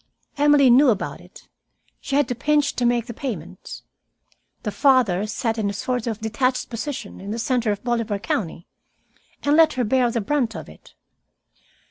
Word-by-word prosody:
Emily 290 -3 +5
knew 265 +3 +6
about 210 -4 -2
it. - - -17 0.5
She 275 - -3
had 290 -3 +3
to - - 0
pinch 290 +3 +1
to 245 - +2
make 240 -1 +1
the 235 - -7
payments. 185 - -7 0.8
The 210 - -2
father 235 -8 +3
sat 225 +1 -2
in 205 -2 0
a - - -3
sort 245 +3 -3
of 220 -1 -3
detached 250 +4 -1
position, 240 -2 -5
in 195 - -8
the 220 - -3
center 235 -1 0
of 205 - -4
Bolivar 230 -4 -1
County, 175 -4 -3 0.8
and 285 +1 +3
let 320 -1 +5
her 255 - -1
bear 245 +2 +2
the 235 - -1
brunt 235 +1 -1
of - - -7
it. - - -17
240 Hz, 175 wpm, -22 LUFS, 215-270 Hz, 0.8 s, knew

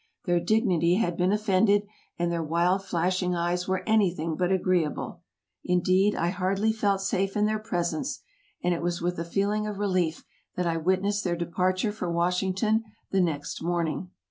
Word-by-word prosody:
Their 175 -1 +2
dignity 175 -3 +2
had 180 -5 0
been 180 +2 +2
offended, 205 0 +3 0.3
and 175 0 0
their 170 -1 -1
wild, 170 +4 +1
flashing 180 0 0
eyes 175 +1 -1
were 190 0 -1
anything 180 -7 +2
but 180 +3 0
agreeable. 180 -4 0 0.4
Indeed, 185 +3 +2
I 170 - 0
hardly 195 +4 0
felt 200 -3 +1
safe 195 +1 -1
in 210 - +3
their 215 0 0
presence, 175 - -2 0.4
and 180 - +2
it 170 - -3
was 175 0 -1
with 175 0 -2
a - - -1
feeling 205 +5 0
of 210 -2 -4
relief 185 -5 0 0.3
that 180 - -1
I 165 -1 0
witnessed 190 +5 +1
their 175 -2 0
departure 185 +4 0
for 180 -4 -4
Washington 185 +6 +1 0.3
the 195 - +3
next 150 -5 -2
morning. 170 +1 -1
185 Hz, 170 wpm, -27 LUFS, 170-200 Hz, 0.4 s, offended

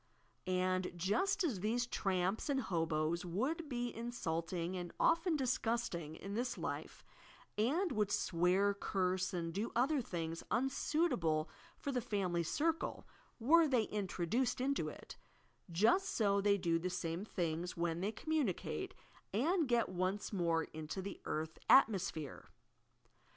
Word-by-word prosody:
And, 185 0 +1
just 235 - +1
as 260 - 0
these 230 +5 +1
tramps 195 0 0
and 275 -1 +2
hoboes 165 -5 0
would 270 - -2
be 245 -2 -2
insult 170 -9 -3
ing 175 0 -2
and 175 -2 -4
often 335 0 +3
disgusting 235 - -1
in 195 +4 -7
this 240 +3 -1
life, - - -5 0.5
and 305 - +1
would 210 -4 +1
swear, 185 +3 +2
curse 185 -1 0
and 170 -3 -3
do 205 +5 -2
other 270 +4 +3
things 165 -6 -4
unsuitable 245 - +1 0.3
for 280 - -3
the 250 -2 0
family 190 -6 0
cir 305 - +2
cle, 325 - -6 0.2
— - - -34
were 335 0 +7
they 255 -5 +3
introduced 210 +5 -1
into 275 +2 0
it, - - -10 0.3
— - - -22
just 380 - +4
so 200 -3 +2
they 200 0 +4
do 170 -3 +1
the 180 +2 -2
same 170 +1 -3
things 175 -3 -2
when 170 0 -1
they 200 +3 0
communicate, 315 - -2 0.4
and 315 - +2
get 240 -1 +3
once 185 +3 -2
more 170 -3 +2
into 160 +5 -6
the 200 - -6
" - - -38
earth 155 +1 -3
atmosphere. 190 - +3
200 Hz, 145 wpm, -36 LUFS, 175-250 Hz, 0.5 s, were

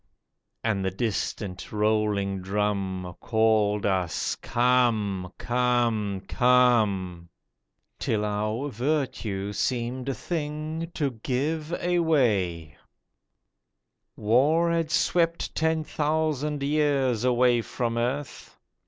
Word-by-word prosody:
And 105 -4 0
the 95 - +1
distant, 100 -2 -3
rolling 105 -2 +1
drum 95 -2 -2
Called 110 -2 +2
us 95 -4 0
'Come, 115 -7 +1
come, 120 -5 0
come!' 110 -9 +2 0.7
Till 105 -1 0
our 110 +6 -2
virtue 115 -7 -2
seemed 125 +4 -2
a 135 - -1
thing 155 +3 -4
to 145 -4 0
give 150 +5 -2
away. 120 - +1 1.4
War 145 +10 +3
had 165 -2 0
swept 170 0 +1
ten 160 0 +1
thousand 150 -2 -1
years 140 -5 +1
away 125 -1 +3
from 115 0 -3
earth. 130 +5 -3
120 Hz, 90 wpm, -26 LUFS, 105-145 Hz, 1.4 s, War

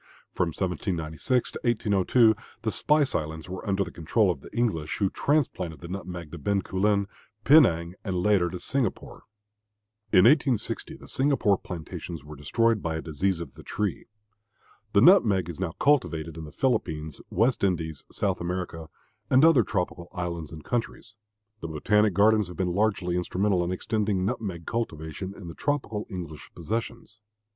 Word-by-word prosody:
From 90 - +1
1796 90 - -1
to - - -7
1802 110 0 +3 0.3
the 110 - 0
spice 150 +1 +2
islands 80 +1 -3
were 95 +1 -6
under 100 0 +2
the 90 - -8
control 90 +5 +1
of 70 - -6
the - - -12
English, 100 -11 -1
who 100 -2 +1
transplanted 115 - 0
the 85 - -7
nutmeg 90 -3 -6
to - - -7
Bencoolen, 100 0 +1 0.4
Penang, 90 - +5
and, 95 -4 -3
later, 90 -1 +3
to 90 - -5
Singapore. 135 +6 -3 0.9
In 90 - +6
1860 135 -3 +2
the - - -14
Singapore 135 -7 +2
plantations 85 -3 -7
were 75 +1 -9
destroyed 110 +10 +1
by 80 -1 -2
a 80 - -3
disease 85 +3 -1
of 75 -6 -7
the 80 - -13
tree. 105 +6 -3 0.9
The 100 - +5
nutmeg 110 - +6
is 85 -1 -7
now 90 -4 -2
cultivated 85 - +1
in 80 -1 -7
the 75 - -10
Philippines, 80 - -1
West 120 0 +1
Indies, 80 -6 -1
South - - -1
America, 85 -2 -4 0.4
and 130 +4 +6
other 165 -6 +6
tropical 90 -4 -3
islands 85 -4 -4
and 80 -1 -9
countries. 115 -2 -3 0.5
The - - -5
botanic 105 +6 +2
gardens 105 0 +4
have 90 - -10
been 90 -2 0
largely 95 -3 +1
instrumental 90 +1 +1
in 85 - -2
extending 100 0 -1
nutmeg 95 -5 -3
cultivation 95 -4 -4
in 100 - -10
the 85 - -7
tropical 130 - -2
English 85 -7 -7
possessions. 115 +5 -5
95 Hz, 155 wpm, -27 LUFS, 85-110 Hz, 0.9 s, In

